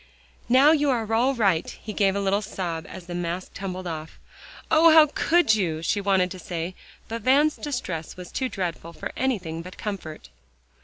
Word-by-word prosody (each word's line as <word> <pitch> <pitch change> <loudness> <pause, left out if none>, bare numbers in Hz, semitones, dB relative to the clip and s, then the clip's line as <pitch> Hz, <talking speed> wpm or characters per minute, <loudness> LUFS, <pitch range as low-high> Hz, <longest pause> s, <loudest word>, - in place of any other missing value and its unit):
"Now 265 +5 +7
you 295 -2 +3
are 225 -4 0
all 255 +4 +3
right;" 195 -8 +2
he 215 - -8
gave 195 -1 +2
a - - 0
little 200 +1 +1
sob 175 -5 -4
as 180 - -9
the 175 - -7
mask 175 +1 -4
tumbled 185 -1 -5
off. 160 -2 -6 0.5
"Oh! 325 +1 +7
how 315 -1 +8
could 345 -9 +3
you?" 165 -7 -1
she 205 +5 0
wanted 190 -2 +2
to 185 - -7
say, 175 0 -4 0.3
but 230 +1 -5
Van's 285 +6 +4
distress 185 - -5
was 180 -1 -9
too 260 -1 -2
dreadful 170 -4 -4
for - - -6
anything 190 -11 -2
but 180 +2 -11
comfort. 170 - -6
195 Hz, 185 wpm, -25 LUFS, 175-250 Hz, 0.5 s, how